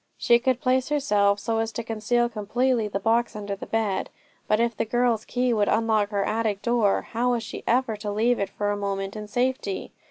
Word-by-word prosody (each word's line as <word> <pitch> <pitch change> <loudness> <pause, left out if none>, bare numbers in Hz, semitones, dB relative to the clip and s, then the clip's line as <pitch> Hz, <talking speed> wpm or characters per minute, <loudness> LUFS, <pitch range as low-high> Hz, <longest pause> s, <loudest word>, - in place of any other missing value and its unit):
She 235 0 +4
could 255 0 +1
place 260 -1 +1
herself 205 -9 +2
so 225 +2 -1
as 225 0 -1
to 235 - -4
conceal 230 +2 0
completely 235 +1 0
the 200 -1 -3
box 230 +3 +1
under 205 -1 -4
the 195 - -9
bed; 215 -4 -1 0.4
but 215 - +2
if 235 -1 +1
the - - 0
girl's 235 -1 +1
key 250 0 0
would 210 -2 +2
unlock 220 -2 +2
her 200 -2 -1
attic 215 -2 -1
door, 235 -4 +2
how 245 +2 +1
was 235 -2 -1
she - - -7
ever 240 -2 +2
to 210 0 -5
leave 230 +4 +2
it 200 - -1
for 205 0 -2
a - - 0
moment 195 0 -3
in 210 0 -6
safety? 245 -4 -2
225 Hz, 215 wpm, -25 LUFS, 205-240 Hz, 0.4 s, She